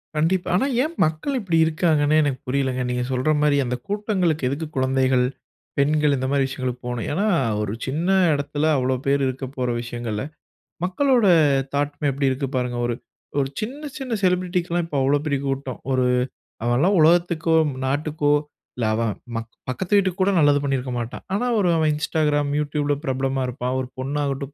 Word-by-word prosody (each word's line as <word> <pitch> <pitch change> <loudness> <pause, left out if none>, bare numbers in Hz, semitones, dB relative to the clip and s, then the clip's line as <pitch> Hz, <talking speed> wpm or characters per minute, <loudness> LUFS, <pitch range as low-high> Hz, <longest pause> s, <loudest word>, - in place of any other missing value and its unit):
கண்டிப்பா. 170 +4 +1
ஆனா 195 - +2 0.2
ஏன் 315 +3 -3
மக்கள் 160 - -2
இப்படி 180 -7 0
இருக்காங்கனே 155 -2 +2
எனக்கு 135 -3 -1
புரியலைங்க. 130 -1 0
நீங்க 125 0 -1
சொல்ற 130 +3 0
மாரி 150 -1 +3
அந்த 125 0 -1
கூட்டங்களுக்கு 190 - 0
எதுக்கு 150 +4 -3
குழந்தைகள், 130 -1 +2 0.5
பெண்கள் 150 0 +3
இந்த 130 0 -2
மாரி 140 -1 +2
விஷயங்களுக்கு 130 -1 -4
போகணும். 125 -1 -3
ஏன்னா, 195 +7 0 0.4
ஒரு 105 -1 -2
சின்ன 155 +6 -2 0.3
இடத்துல 145 +1 -1
அவ்வளோ 130 0 +1
பேர் 140 0 +3
இருக்க 130 +1 -4
போற 125 -1 0
விஷயங்கள்ல, 120 -3 -4 0.6
மக்களோட 240 +4 +2 0.5
தாட்டு 145 0 0
மே 145 - +2
எப்படி 135 0 +1
இருக்கு 135 +1 -2
பாருங்க! 125 -1 -2
ஒரு 120 - -1 0.4
ஒரு 135 -1 0
சின்ன, 250 +7 -4 0.2
சின்ன 260 -3 -4
செலிபிரிட்டிக்கு 180 -1 +1
லாம் 175 0 +1
இப்போ 155 -4 -4
அவ்வளவு 140 +2 +2
பெரிய 145 -3 0
கூட்டம். 135 -2 -3
ஒரு 130 -1 +2 0.6
அவன்ல்லாம் 130 +12 +3
உலகத்துக்கோ, 165 0 +3 0.3
நாட்டுக்கோ, 145 +2 0 0.5
இல்ல 120 - -1
அவன் 115 0 0 0.2
மக் 115 0 -4 0.2
பக்கத்து 185 +10 0
வீட்டுக்கு 190 -1 +1
கூட 195 +2 +3
நல்லது 145 -2 +4
பண்ணியிருக்க 135 -2 -1
மாட்டான். 120 0 -6
ஆனா 205 +5 0
ஒரு 185 -3 +2
அவன் 155 -1 +2
Instagram, 150 -1 0
YouTube 145 0 -1
ல - - +3
பிரபலமா 135 0 -1
இருப்பான். 125 0 -3
ஒரு 130 - -3
பொண்ணாகட்டும், 140 0 -2
145 Hz, 165 wpm, -23 LUFS, 130-165 Hz, 0.6 s, நல்லது